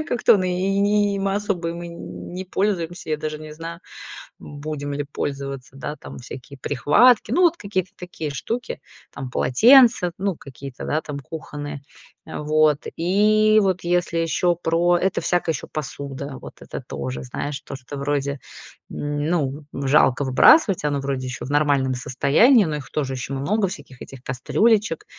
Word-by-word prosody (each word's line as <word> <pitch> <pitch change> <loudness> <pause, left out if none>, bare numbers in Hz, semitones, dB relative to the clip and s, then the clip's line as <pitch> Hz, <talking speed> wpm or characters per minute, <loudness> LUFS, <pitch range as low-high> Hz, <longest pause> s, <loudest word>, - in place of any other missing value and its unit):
мы 310 - -3
как-то 240 - +4
и 185 - 0
и 200 +2 +2
им 195 - -2
особо 195 -4 -1
им 170 +1 -6
и 170 - -6
не 175 +2 -8
пользуемся. 175 -4 -2
Я 155 - +1
даже 155 0 -4
не 155 0 -9
знаю, 165 +2 -8 0.6
будем 145 -1 -6
ли 145 0 -3
пользоваться. 135 -2 -5
Да, 140 +3 -5
там - - -11
всякие 130 +3 -10
прихватки. 175 - +4
Ну, 360 - +3
вот 340 -1 +4
какие-то 190 -2 -2
такие 170 -4 -6
штуки, 230 - -4 0.3
там 135 -2 -7
полотенца, 230 - +5
ну, 195 -3 -1
какие-то, 135 -1 -9
да, 155 - 0
там, 145 -2 -6
кухонные. 145 0 -7 0.4
Вот. 150 0 +1
И 215 +5 +4
вот, 185 -2 0
если 175 -1 0
еще 170 +2 +1
про 175 +1 +2
это 190 +2 0
всякая 175 -2 +1
еще 125 - -6
посуда. 140 -2 -6
Вот - - -10
это - - -7
тоже, 65 -1 -5
знаешь, 140 - -4
то, 140 - -8
что 135 +2 -8
вроде, 140 0 -1 0.5
м, 145 0 -3
ну, 150 -3 -1 0.2
жалко 145 -1 +4
выбрасывать. 185 - +5
Оно 145 -1 0
вроде 135 -1 -3
еще 125 -1 -5
в - - -8
нормальном 140 -3 +2
состоянии, 155 - +4
но 155 - -2
их 145 -3 -7
тоже 135 -3 -2
еще 130 +1 -5
много 195 +10 0
всяких 145 -7 -10
этих 135 -2 -12
кастрюлечек, 200 - +1
155 Hz, 160 wpm, -22 LUFS, 140-185 Hz, 0.6 s, полотенца